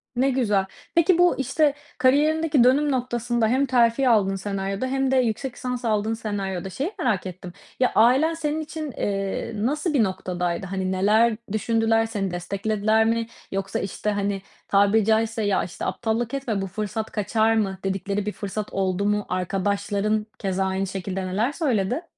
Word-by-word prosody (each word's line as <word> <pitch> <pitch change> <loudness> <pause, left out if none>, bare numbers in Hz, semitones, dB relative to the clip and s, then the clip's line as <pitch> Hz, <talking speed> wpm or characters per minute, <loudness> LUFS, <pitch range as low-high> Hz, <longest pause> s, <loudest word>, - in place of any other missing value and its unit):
Ne 260 +3 +2
güzel. 210 -7 +1 0.3
Peki 335 +1 +4
bu, 355 0 +4
işte, 280 +3 +2 0.2
kariyerindeki 295 +2 +3
dönüm 285 +4 +4
noktasında, 240 -2 0
hem 260 +5 +2
terfi 250 0 +3
aldığın 200 -4 +3
senaryoda 195 +3 -3
hem 270 0 0
de - - +3
yüksek 250 +1 0
lisansa 250 -2 -3
aldığın 215 +1 +1
senaryoda, 195 -4 -3
şeyi 280 - -3
merak 210 -7 0
ettim, 180 -1 -8 0.3
ya, 255 - +3
ailen 260 +9 +5
senin 315 -1 -2
için, 310 -1 -5
eee, 195 0 -2
nasıl 295 - -1
bir 260 -6 +4
noktadaydı? 180 -2 -2
Hani, 190 0 -2
neler 215 +4 +3
düşündüler? 225 +1 +2
Seni 205 -4 -3
desteklediler 210 +5 0
mi? 230 0 0 0.2
Yoksa 195 0 -2
işte, 200 +2 -3
hani, 200 -1 -1 0.3
tabiri 205 +2 +4
caizse, 220 0 +1
ya, 205 -2 +1
işte 175 - -6
"aptallık 230 +2 -1
etme 245 -7 -2
bu 195 - -3
fırsat 215 +3 -4
kaçar 220 +2 +1
mı?" 195 -3 0
dedikleri 195 +1 -2
bir 210 - -1
fırsat 205 +1 -5
oldu 190 0 0
mu? 210 0 +1
Arkadaşların 200 +3 -1
keza 190 -1 -1
aynı 190 +1 -1
şekilde 190 0 -4
neler 210 +8 0
söyledi? 255 - 0
220 Hz, 160 wpm, -24 LUFS, 195-250 Hz, 0.3 s, ailen